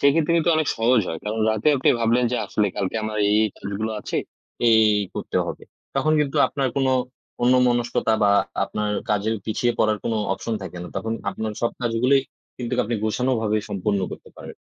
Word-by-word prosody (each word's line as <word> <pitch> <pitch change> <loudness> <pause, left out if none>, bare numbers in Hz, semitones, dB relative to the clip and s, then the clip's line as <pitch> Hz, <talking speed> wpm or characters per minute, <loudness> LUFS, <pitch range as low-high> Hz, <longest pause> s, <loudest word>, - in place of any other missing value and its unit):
সেক্ষেত্রে 150 +3 +3
কিন্তু 170 +1 +2
অনেক 155 -2 +1
সহজ 115 +1 +3
হয়। 80 - -4
কারণ 105 +1 -2
রাতে 110 +6 +1
আপনি 130 - +1
ভাবলেন 115 +2 +3
যে - - +1
আসলে 105 - +1
কালকে 100 +1 -2
আমার 110 0 -3
এই, 105 - +3
এই 110 - +2
কাজগুলো 105 +2 -4
আছে, - - -4 0.5
এই, 110 - +6 0.2
এই 100 - -1
করতে - - -4
হবে। - - -6 0.3
তখন 155 +3 +2
কিন্তু 140 -2 -1
আপনার 135 -2 -1
কোনো 135 -1 +2 0.5
অন্য 125 +1 +5
মনস্কতা 120 -2 +1
বা 100 -1 +5 0.3
আপনার 105 0 -3 0.2
কাজের 105 +2 +1
পিছিয়ে 120 +2 0
পড়ার 110 -1 +2
কোনো 115 - 0 0.2
অপশন 110 +3 -3
থাকে 90 -1 -8
না। 90 - -7
তখন 110 0 -2 0.2
আপনার 110 -1 -4
সব 120 - +2
কাজগুলোই 125 +4 +3 0.4
কিন্তুক 125 0 -3
আপনি 120 - -2
গোছানোভাবে 110 -1 0
সম্পন্ন 100 0 -1
করতে - - -10
পারেন। - - -10
115 Hz, 190 wpm, -23 LUFS, 105-125 Hz, 0.5 s, এই